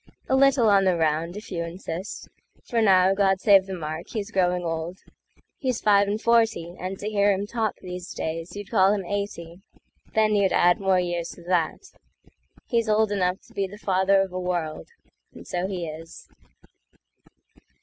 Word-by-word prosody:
A 265 - +2
little 270 -3 +4
on 200 -2 +4
the 185 -2 +2
round 160 +3 0
if 210 - -10
you 170 -2 -2
insist, 170 +2 -6 0.4
For 235 -2 -1
now, 190 -2 +5
God 195 -1 +2
save 195 -1 +5
the 190 - -4
mark, 155 0 -6
he's 210 -3 -5
growing 180 -1 +1
old; 165 +2 -3 0.6
He's 255 -4 -1
five 200 -1 +4
and 205 +2 -1
forty, 225 -7 +1
and 185 +1 -4
to 205 - -6
hear 205 -1 +2
him 195 +1 -1
talkThese 190 -5 -4
days 165 +3 -4
you'd 205 -1 -8
call 195 -3 +4
him 195 -3 -4
eighty; 180 -3 -5 0.5
then 215 -1 +3
you'd 200 -2 +2
addMore 180 +1 +3
years 175 -1 -3
to 175 - -14
that. 175 - -1 0.7
He's 230 -2 0
old 215 0 +2
enough 185 -2 0
to - - -21
beThe 200 +1 -4
father 195 -1 +2
of 190 -1 -3
a 185 - -3
world, 175 -4 -3 0.5
and - - -11
so 180 +1 -2
he 180 -4 -4
is. 160 +1 -10
190 Hz, 170 wpm, -25 LUFS, 175-205 Hz, 0.7 s, now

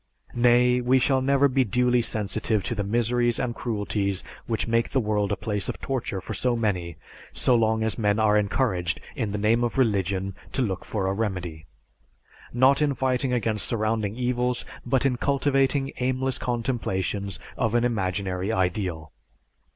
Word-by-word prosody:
Nay, 125 +1 +4
we 125 +2 +3
shall 130 +1 +2
never 140 +1 +3
be 135 0 +2
duly 125 +2 +2
sensitive 110 -1 -1
to - - -2
the 105 -3 -2
miseries 120 +2 +1
and 125 -2 -1
cruelties 105 -4 -2 0.2
which 115 -1 -1
make 115 0 +1
the 135 - +1
world 105 -3 0
a - - +2
place 105 -2 -3
of - - -4
torture 130 -7 -3
for - - -6
so 125 -1 0
many, 90 -7 -1 0.4
so 125 - +2
long 110 -1 +2
as 110 +1 -1
men 105 -1 +2
are 110 -1 +3
encouraged 100 - 0 0.2
in 110 -3 -2
the 105 - -2
name 110 +4 +2
of 120 +2 -2
religion 100 -5 +1 0.2
to 135 - +1
look 95 -5 -3
for 100 -3 -2
a 95 - 0
remedy, 90 -7 -4 0.8
not 130 +4 +4
in 145 -2 +2
fighting 130 0 0
against 110 -4 +1
surrounding 110 -2 -1
evils, 125 0 -1 0.2
but 130 +2 +1
in 125 -2 +2
cultivating 135 0 +1
aimless 130 +1 0
contemplations 105 -5 -2 0.2
of 115 -3 0
an 120 - +3
imaginary 95 -3 -1
ideal. 90 -5 -1
115 Hz, 165 wpm, -25 LUFS, 100-125 Hz, 0.8 s, Nay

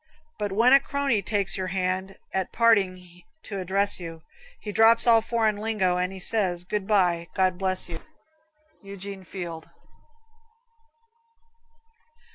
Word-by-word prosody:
But 205 -1 -2
when 230 +6 +4
a 275 - +8
crony 275 -5 -1
takes 200 -1 0
your 185 -1 -3
hand 185 +1 -2 0.2
At 190 -1 -2
parting 185 -6 +1 0.2
to 200 -2 -6
address 195 +2 +1
you, 165 -2 -9 0.4
He 210 - -6
drops 225 +2 +4
all 230 -2 +5
foreign 220 -2 0
lingo 205 -4 0
and 180 +1 -1
He 195 - -9
says, 185 -3 +1
"Good 195 +1 -3
bye, 175 -5 +2
God 185 -1 +1
bless 185 -1 -1
you." 165 -2 -7 0.8
Eugene 195 -1 -8
Field. 170 -3 -8
195 Hz, 130 wpm, -25 LUFS, 180-215 Hz, 0.8 s, a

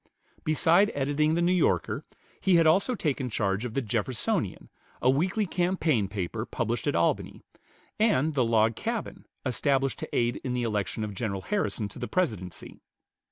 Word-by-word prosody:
Beside 165 +5 +4
editing 145 +3 +1
the 170 - +1
"New 175 - +3
Yorker," 180 -2 +1 0.4
he 190 -2 +3
had 165 -1 +5
also 195 +10 +3
taken 140 - -1
charge 100 0 -1
of 115 - -5
the 135 - 0
"Jeffersonian," 115 +2 -1 0.3
a 130 - +4
weekly 185 +9 +1
campaign 175 - +1
paper 100 +2 -3
published 120 +1 -2
at 145 - +1
Albany, 85 - 0 0.6
and 160 - +3
the 135 -3 +2
"Log 115 -1 +3
Cabin," 230 - -4 0.2
established 135 +1 +1
to - - -5
aid 120 0 +1
in 125 - -2
the 125 - -1
election 110 -1 -2
of 105 -1 -4
General 100 -2 -3
Harrison 200 - -1
to 100 - -11
the 120 - -3
Presidency. 105 - -3
130 Hz, 160 wpm, -28 LUFS, 110-170 Hz, 0.6 s, had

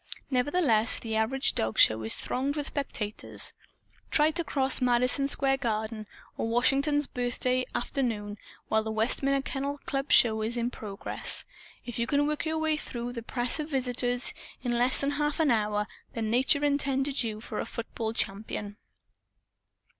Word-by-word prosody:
Nevertheless, 250 -4 +2
the 225 -1 -4
average 240 +5 +1
dogshow 110 0 +3
is 110 - 0
thronged 275 +3 -2
with 295 -2 -2
spectators. 220 -8 -1 0.6
(Try 310 0 +3
to 340 +2 -2
cross 270 -4 +2
Madison 250 +2 +2
Square 270 -1 +2
Garden, 220 -2 -3 0.3
on 225 - -1
Washington's 275 +5 +2
Birthday 250 +1 -1
afternoon, 215 -6 -2 0.3
while 220 0 +2
the 220 - -5
Westminster 270 +5 +1
Kennel 280 +1 -1
Club's 275 +1 +2
Show 220 -2 +4
is 225 +3 -2
in 240 +1 -1
progress. 200 -4 -2 0.4
If 240 -1 -5
you 235 - 0
can 285 0 +2
work 300 +1 -2
your 320 0 -1
way 315 -1 +1
through 245 -4 -5
the 235 - -5
press 245 +4 0
of 305 0 -3
visitors 245 -2 0 0.3
in 245 - -1
less 250 +2 +5
than 280 0 +1
half 295 +1 -1
an 310 -4 +3
hour, 210 -2 +1 0.3
then 220 -2 -2
Nature 265 +4 +3
intended 280 -1 +1
you 220 -3 -3
for 220 - -6
a - - -2
football 225 -1 -4
champion.) 205 -1 -3
250 Hz, 155 wpm, -28 LUFS, 220-280 Hz, 0.6 s, less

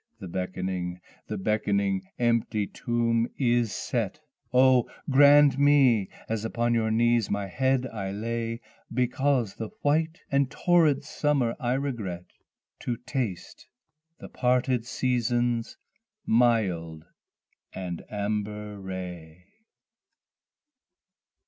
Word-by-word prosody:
the 95 - -7
beckoning 90 0 -3 0.3
the - - -4
beckoning 100 -1 0 0.2
empty 115 -3 +1
tomb 115 +1 0
is 120 -4 +2
set! - - -2 0.3
Oh 130 -1 +4 0.2
grant 145 0 +6
me 135 -8 +4 0.2
as 110 -1 -2
upon 120 +1 0
your 115 -1 +1
knees 120 0 +2
my 100 0 -1
head 130 +5 0
I 100 -6 -5
lay, 115 +2 -3 0.3
(Because 125 -1 +1
the 110 -1 -6
white 160 +3 +1
and 140 -1 +2
torrid 155 -3 +3
summer 145 -5 0
I 125 -2 0
regret), 115 -11 -3 0.5
To 120 -2 -3
taste 125 -7 -5 0.5
the - - -10
parted 125 -1 0
season's 120 -2 0 0.5
mild 95 -9 +1 0.7
and 90 -3 -5
amber 105 0 -3
ray. 90 -3 -7
115 Hz, 100 wpm, -27 LUFS, 100-130 Hz, 0.7 s, grant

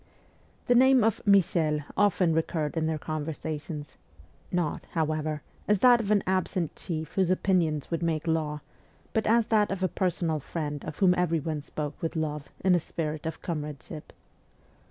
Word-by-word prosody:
The 245 - +4
name 260 0 +6
of 225 -2 +1
' - - -32
Michel 170 -6 +3
' - - -31
often 180 -4 +2
recurred 160 -1 -1
in 160 -1 0
their 160 -1 0
conver 155 0 -4
sations 150 -1 -6 0.5
not, 175 -4 -1
however, 155 -1 -1 0.2
as 210 - +4
that 245 +3 +6
of 205 - -4
an 210 -2 +3
absent 185 -2 -1
chief 160 -2 -5
whose 190 -2 +2
opinions 175 -6 +1
would 165 - -1
make 160 -2 -1
law, 155 -2 -1 0.5
but 220 - +1
as 230 +1 +4
that 210 -1 +4
of 190 -1 -2
a - - +4
personal 175 -4 -1
friend 145 0 -4
of 150 - -6
whom 185 -2 +5
everyone 165 -4 0
spoke 150 0 -6
with 165 - -2
love, 150 -2 -3 0.2
in 185 - +5
a 175 - +4
spirit 155 -1 -4
of 160 - -6
comradeship. 150 -2 -6
165 Hz, 175 wpm, -28 LUFS, 155-185 Hz, 0.5 s, name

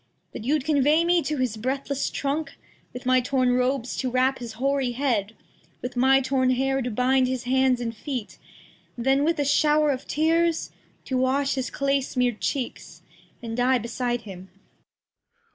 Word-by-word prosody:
That - - -7
you'd 285 +1 +1
convey 300 +2 +3
me 345 0 +3
to 305 -2 -2
his 250 -4 -1
breathless 270 +4 -2
Trunk, 290 +3 -3 0.3
With 250 - -9
my 255 0 +4
torn 255 0 +1
Robes 250 0 0
to 260 - -1
wrap 255 +2 +1
his 235 -2 -7
hoary 265 +1 0
Head, 230 -5 -1 0.5
With 250 +1 -5
my 265 +2 +4
torn 260 -1 +1
Hair 270 +1 +1
to 250 - -2
bind 255 +3 +2
his 255 -1 -3
Hands 260 0 +2
and 230 -1 -4
Feet, 250 -1 -6 0.6
Then 270 +4 +2
with 330 +2 +1
a 290 - +1
Show'r 300 +1 +3
of 265 -1 -5
Tears 330 +2 +1 0.3
To 260 -1 -1
wash 270 +2 +1
his 260 -1 -2
Clay 275 0 0
smear'd 250 -3 -1
Cheeks, 270 -4 -4 0.4
and 225 -1 -4
Die 250 +2 +3
beside 240 +1 -2
him. 190 -3 -10
260 Hz, 165 wpm, -25 LUFS, 245-280 Hz, 0.6 s, my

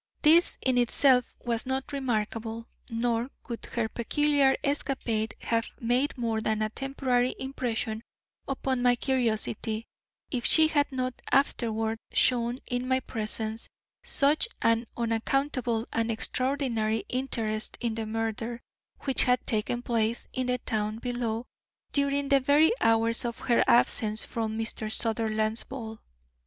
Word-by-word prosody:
This 330 +3 +5
in 255 -1 +3
itself 250 +1 +3
was 235 +1 -1
not 265 +1 -1
remarkable 225 -3 -2 0.2
nor 235 +1 0 0.2
would 235 -2 -5
her 235 -2 -1
peculiar 275 +4 +2
escapade 260 -6 -1
have 230 0 0
made 250 +5 +1
more 225 -2 -1
than 215 -1 0
a 215 - -2
temporary 255 -1 0
impression 240 -4 -3 0.5
upon 265 -2 -1
my 245 0 +4
curiosity 225 -3 0 0.5
if 245 -3 -2
she 315 +4 +5
had 290 -2 +1
not 255 -1 -3
afterward 225 -5 +1
shown 240 -1 +3
in 245 +1 -2
my 260 0 +2
presence 220 -1 -3 0.3
such 295 - +2 0.2
an 230 0 +2
unaccountable 235 0 0
and 230 0 0
extraordinary 230 -2 0
interest 225 -4 -2
in 235 -2 -1
the 220 -1 -4
murder 225 +1 -3 0.4
which 270 -2 +1
had 250 0 +2
taken 235 +2 -1
place 230 -1 0
in 255 -1 -1
the 250 0 +1
town 215 -3 -2
below 240 -1 -2 0.5
during 280 0 +1
the 275 0 +5
very 290 +4 +4
hours 225 0 +3
of 235 0 -3
her 240 - +2
absence 220 -2 +3
from 220 -1 -3
Mr. 225 -1 -2
Sutherland's 220 -1 +1
ball. 225 -4 -8
235 Hz, 130 wpm, -28 LUFS, 225-260 Hz, 0.5 s, This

